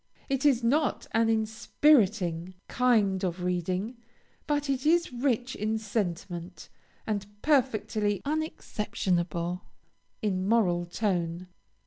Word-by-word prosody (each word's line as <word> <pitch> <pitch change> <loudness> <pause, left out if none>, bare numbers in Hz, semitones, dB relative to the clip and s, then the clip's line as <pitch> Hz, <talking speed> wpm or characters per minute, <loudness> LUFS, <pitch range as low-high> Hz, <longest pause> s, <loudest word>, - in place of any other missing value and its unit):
It 270 +1 +2
is 250 -4 +3
not 285 +4 +1
an 225 0 +3
inspiriting 220 - +2
kind 215 -7 +2
of 180 -1 -2
reading, 180 +6 -1 0.5
but 290 -1 0
it 270 -1 -1
is 335 -2 +3
rich 245 0 0
in 215 +2 -1
sentiment, 185 -4 -4 0.4
and 205 -2 -2 0.2
perfectly 220 -8 +1
unexceptionable 180 - -2 0.6
in 190 -2 0
moral 175 -7 +2
tone. 175 -2 -2
215 Hz, 100 wpm, -28 LUFS, 180-250 Hz, 0.6 s, is